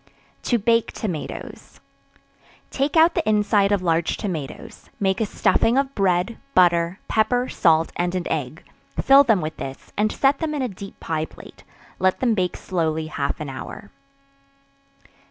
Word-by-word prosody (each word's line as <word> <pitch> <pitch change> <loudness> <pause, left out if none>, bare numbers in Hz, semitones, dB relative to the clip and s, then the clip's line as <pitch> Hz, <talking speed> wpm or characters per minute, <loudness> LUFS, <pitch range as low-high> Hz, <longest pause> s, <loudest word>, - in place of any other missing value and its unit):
To 240 - +4
Bake 230 +1 +2
Tomatoes. 180 -9 -6 0.9
Take 280 +4 0
out 325 +2 +6
the 215 - 0
inside 210 -1 +3
of 200 -3 +1
large 165 -1 +1
tomatoes, 185 - -6
make 190 +1 0
a 220 - +1
stuffing 230 +4 +2
of 275 0 0
bread, 190 +1 +1 0.2
butter, 170 0 +3
pepper, 245 +3 +1
salt 165 -1 +2
and 175 +1 -1
an 180 -1 -2
egg; - - -3 0.4
fill 275 +1 +7
them 220 -9 +2
with 155 +1 -5
this, 135 0 -8
and 215 +1 +1
set 275 +1 +2
them 310 -2 -2
in 280 - -1
a - - 0
deep 195 -2 -10
pie 160 -1 -2
plate; - - -15 0.4
let 185 0 +2
them 245 -3 +2
bake 185 -4 -1
slowly 160 -3 -2
half 140 -1 -2
an 150 -2 -5
hour. 200 +10 -9
195 Hz, 155 wpm, -22 LUFS, 170-235 Hz, 0.9 s, fill